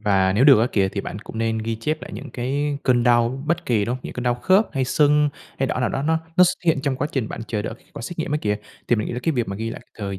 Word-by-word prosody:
Và 95 Hz, -3 st, +3 dB
nếu 120 Hz, +7 st, +3 dB
được 135 Hz, -7 st, +8 dB
á 120 Hz, -, +3 dB
kìa, 95 Hz, -2 st, +2 dB
thì 100 Hz, -, -3 dB
bạn 100 Hz, -, -6 dB
cũng 110 Hz, -, -8 dB
nên 115 Hz, 0 st, 0 dB
ghi 115 Hz, +1 st, -2 dB
chép 155 Hz, +8 st, -2 dB
lại -, -, -7 dB
những 130 Hz, +8 st, -8 dB
cái 140 Hz, +3 st, -2 dB
cơn 120 Hz, -2 st, +3 dB
đau 120 Hz, +2 st, +2 dB
bất 170 Hz, +1 st, -1 dB
kỳ, 110 Hz, -4 st, +2 dB
đúng 120 Hz, -, -1 dB
hông? 130 Hz, -, -7 dB
Những -, -, -6 dB
cơn 125 Hz, -, -4 dB
đau 120 Hz, -1 st, +2 dB
khớp, 190 Hz, -, +3 dB
hay 135 Hz, -2 st, 0 dB
sưng, 150 Hz, +2 st, +3 dB, 0.3 s
hay 135 Hz, -, +1 dB
đỏ 125 Hz, -, -2 dB
nào 125 Hz, -, +2 dB
đó 135 Hz, -, -2 dB
nó 160 Hz, +1 st, +2 dB, 0.2 s
nó 180 Hz, -, +8 dB
x -, -, +4 dB, 0.2 s
hiện 160 Hz, -5 st, +3 dB
trong 135 Hz, -3 st, 0 dB
quá 145 Hz, -, -1 dB
trình 125 Hz, -6 st, -1 dB
bạn -, -, -6 dB
chờ 105 Hz, -2 st, -2 dB
đợi -, -, -4 dB
kết -, -, -26 dB
quả -, -, -8 dB
xét 175 Hz, +6 st, -6 dB
nghiệm 160 Hz, -, -2 dB
á 150 Hz, -, +2 dB
kìa, 105 Hz, 0 st, 0 dB, 0.3 s
thì 120 Hz, -, +4 dB
mình 105 Hz, -, -1 dB
nghĩ -, -, -4 dB
là 120 Hz, -, -3 dB
cái 165 Hz, -, +1 dB
việc 120 Hz, -6 st, -1 dB
mà 100 Hz, -, -4 dB
ghi 115 Hz, +1 st, -3 dB
lại -, -, -7 dB, 0.2 s
thời 100 Hz, -2 st, -4 dB
125 Hz, 330 wpm, -22 LUFS, 110-145 Hz, 0.3 s, được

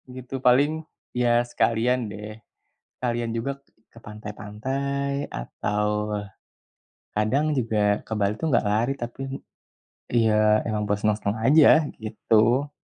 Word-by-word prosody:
gitu 130 Hz, +1 st, -7 dB
paling 140 Hz, +5 st, +4 dB, 0.4 s
ya 120 Hz, -1 st, +3 dB
sekalian 120 Hz, +1 st, +1 dB
deh, 105 Hz, +1 st, -8 dB, 0.6 s
sekalian 120 Hz, -2 st, -1 dB
juga 135 Hz, +4 st, -3 dB, 0.3 s
ke 115 Hz, -, -14 dB
pantai-pantai 130 Hz, +7 st, -4 dB
atau 105 Hz, -, -2 dB, 1.0 s
kadang 130 Hz, +9 st, +1 dB
juga 105 Hz, -4 st, +1 dB
ke -, -, -4 dB
Bali 100 Hz, 0 st, +2 dB
itu -, -, -2 dB
gak 120 Hz, -, +3 dB
lari 110 Hz, +6 st, +1 dB
tapi, 120 Hz, +2 st, -6 dB, 0.9 s
ya 110 Hz, -2 st, +3 dB
emang 105 Hz, -2 st, -1 dB
buat 105 Hz, 0 st, 0 dB
senang-senang 105 Hz, -1 st, 0 dB
aja 155 Hz, +4 st, +6 dB, 0.2 s
gitu. 115 Hz, +5 st, +2 dB
115 Hz, 110 wpm, -25 LUFS, 105-130 Hz, 1.0 s, aja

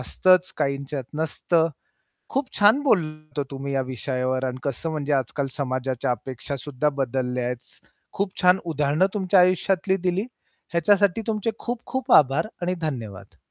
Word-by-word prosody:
असतंच, 185 Hz, +7 st, +3 dB
काहींच्यात 140 Hz, 0 st, -2 dB
नसतं. 160 Hz, +1 st, +1 dB, 0.6 s
खूप 275 Hz, +2 st, 0 dB
छान 210 Hz, +7 st, +6 dB
बोलतात 155 Hz, -, 0 dB
हो -, -, +2 dB
तुम्ही 140 Hz, 0 st, -5 dB
या 135 Hz, -, +1 dB
विषयावर 130 Hz, +1 st, -2 dB
अन् 130 Hz, -1 st, -3 dB
कसं 140 Hz, +4 st, -3 dB
म्हणजे 150 Hz, -2 st, -2 dB
आजकाल 135 Hz, +1 st, 0 dB
समाजाच्या 130 Hz, -2 st, -2 dB
अपेक्षा 130 Hz, +3 st, -4 dB
सुद्धा 145 Hz, +2 st, -1 dB
बदलल्यात. 125 Hz, -1 st, -1 dB, 0.6 s
खूप 200 Hz, 0 st, -1 dB
छान 180 Hz, +1 st, +6 dB
उदाहरणं 155 Hz, +1 st, +2 dB
तुमच्या 190 Hz, -2 st, +3 dB
आयुष्यातली 185 Hz, +1 st, +2 dB
दिली. 185 Hz, +3 st, -1 dB, 0.5 s
ह्याच्यासाठी 200 Hz, +4 st, +3 dB
तुमचे 220 Hz, 0 st, 0 dB
खूप-खूप 245 Hz, +2 st, -3 dB
आभार 140 Hz, +4 st, +5 dB, 0.2 s
आणि 180 Hz, +1 st, 0 dB
धन्यवाद. 110 Hz, -, -5 dB
150 Hz, 135 wpm, -24 LUFS, 130-185 Hz, 0.6 s, छान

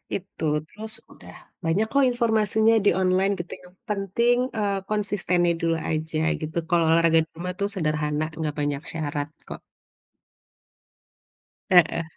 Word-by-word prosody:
itu, 190 Hz, -3 st, -7 dB, 0.2 s
terus 220 Hz, +4 st, -6 dB, 0.2 s
udah -, -, -13 dB, 0.3 s
banyak 175 Hz, +7 st, +1 dB
kok 280 Hz, -1 st, +4 dB
informasinya 220 Hz, -2 st, +2 dB
di -, -, +7 dB
online 185 Hz, +2 st, +2 dB
gitu, 175 Hz, -, -6 dB
yang 180 Hz, 0 st, -16 dB, 0.2 s
penting, 210 Hz, +5 st, +1 dB, 0.2 s
eee, 200 Hz, -2 st, 0 dB
konsistennya 195 Hz, -5 st, +1 dB
dulu 165 Hz, 0 st, +1 dB, 0.2 s
aja 155 Hz, 0 st, -2 dB, 0.2 s
gitu, 160 Hz, +2 st, -5 dB
kalau 170 Hz, -1 st, +3 dB
olahraga 165 Hz, 0 st, +5 dB
di -, -, -38 dB
rumah 180 Hz, +2 st, -4 dB
tuh 200 Hz, -, +1 dB
sederhana 150 Hz, -2 st, -1 dB
enggak 155 Hz, -2 st, -3 dB
banyak 145 Hz, -1 st, -1 dB
syarat 145 Hz, -2 st, -3 dB, 0.2 s
kok. -, -, -6 dB, 2.1 s
Heeh. 170 Hz, -2 st, +5 dB
175 Hz, 135 wpm, -24 LUFS, 160-205 Hz, 2.1 s, di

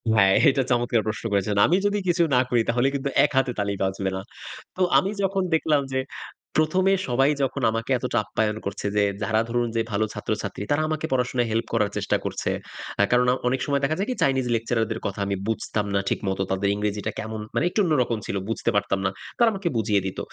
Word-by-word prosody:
হ্যাঁ, 95 Hz, -2 st, +5 dB, 0.2 s
এটা 135 Hz, -1 st, +1 dB
চমৎকার 120 Hz, -1 st, +2 dB
প্রশ্ন 110 Hz, +1 st, -3 dB
করেছেন। 100 Hz, +1 st, +1 dB
আমি 175 Hz, -, +3 dB
যদি 205 Hz, 0 st, +1 dB
কিছু 175 Hz, 0 st, +3 dB
না -, -, +5 dB
করি 120 Hz, -2 st, +3 dB
তাহলে 120 Hz, +3 st, +2 dB
কিন্তু 140 Hz, 0 st, -2 dB
এক -, -, +2 dB
হাতে 130 Hz, -1 st, +3 dB
তালি 100 Hz, 0 st, 0 dB
বাজবে 95 Hz, 0 st, -1 dB
না। 95 Hz, -, -3 dB, 0.5 s
তো 185 Hz, -, -4 dB, 0.2 s
আমি 195 Hz, +2 st, +2 dB
যখন 195 Hz, 0 st, +1 dB
দেখলাম 155 Hz, -2 st, +3 dB
যে 130 Hz, -, +1 dB, 0.6 s
১ম 155 Hz, +4 st, +2 dB
এ -, -, +5 dB
সবাই 135 Hz, +4 st, +3 dB
যখন 130 Hz, -, -2 dB
আমাকে 115 Hz, +3 st, -3 dB
এতটা 125 Hz, 0 st, -2 dB
আপ্যায়ন 110 Hz, -1 st, -1 dB
করছে 100 Hz, +1 st, -4 dB
যে 105 Hz, -, +4 dB, 0.2 s
যারা 110 Hz, 0 st, +2 dB
ধরুন 120 Hz, 0 st, 0 dB
যে 115 Hz, -, +2 dB
ভালো 105 Hz, +1 st, +1 dB
ছাত্রছাত্রী 105 Hz, -2 st, -4 dB
তারা 150 Hz, +2 st, +3 dB
আমাকে 155 Hz, 0 st, -2 dB
পড়াশোনায় 125 Hz, -2 st, 0 dB
হেল্প 115 Hz, +1 st, 0 dB
করার 105 Hz, -3 st, +1 dB
চেষ্টা -, -, +1 dB
করছে। -, -, -2 dB, 0.5 s
আ -, -, +6 dB
কারণ 125 Hz, 0 st, +4 dB
অ -, -, +1 dB
অনেক 130 Hz, +1 st, +1 dB
সময় 140 Hz, -1 st, 0 dB
দেখা 155 Hz, +3 st, +1 dB
যায় 200 Hz, -, -1 dB
কি? 250 Hz, -, -1 dB
চাইনিজ 130 Hz, -2 st, +2 dB
lecturer 115 Hz, 0 st, 0 dB
দের 115 Hz, -, -2 dB
কথা 100 Hz, +1 st, -5 dB
আমি 100 Hz, -, 0 dB
বুঝতাম 110 Hz, -1 st, -1 dB
না -, -, +3 dB
ঠিক -, -, 0 dB
মত। 95 Hz, -, -2 dB
তাদের 95 Hz, +1 st, 0 dB
ইংরেজিটা 105 Hz, 0 st, -2 dB
কেমন 110 Hz, 0 st, -5 dB
মানে -, -, +2 dB
একটু 210 Hz, -, -2 dB
অন্যরকম 125 Hz, -8 st, +1 dB
ছিল। -, -, -3 dB
বুঝতে 115 Hz, -, -1 dB
পারতাম 95 Hz, -1 st, +1 dB
না। -, -, +3 dB, 0.3 s
তারা 235 Hz, -1 st, +5 dB
আমাকে 195 Hz, -3 st, -3 dB
বুঝিয়ে 105 Hz, -3 st, +2 dB
দিত। 95 Hz, -, -5 dB
120 Hz, 220 wpm, -24 LUFS, 105-140 Hz, 0.6 s, আ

